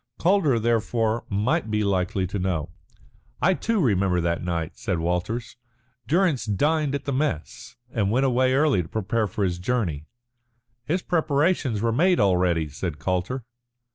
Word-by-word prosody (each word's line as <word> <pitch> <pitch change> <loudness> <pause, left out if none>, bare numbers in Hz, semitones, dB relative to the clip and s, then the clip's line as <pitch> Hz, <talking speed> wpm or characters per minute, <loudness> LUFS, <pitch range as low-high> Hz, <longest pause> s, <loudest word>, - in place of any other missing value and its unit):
Calder, 175 -8 +3
therefore, 115 0 0
might 110 +8 0
be 105 0 0
likely 95 -1 0
to 95 +2 -4
know. 85 -4 -2 0.7
"I 190 - +3
too 225 +3 -1
remember 95 - +2
that 85 0 -1
night," 85 -2 -3
said 95 - -2
Walters. 90 +9 -2 0.5
"Durrance 170 -3 +2
dined 145 +7 +1
at 140 - -5
the 140 - -1
mess 125 - -3 0.2
and 105 -5 +1
went 130 +5 +2
away 130 0 +2
early 145 -8 +3
to 80 - -9
prepare 110 +1 -1
for 100 +2 -3
his 90 -2 -1
journey." 90 -8 -2 0.8
"His 180 +5 -1
preparations 150 - +1
were 115 - +2
made 175 +9 +3
already," 90 -4 +2
said 75 +2 -5
Calder. 95 - -2
110 Hz, 150 wpm, -24 LUFS, 90-140 Hz, 0.8 s, Calder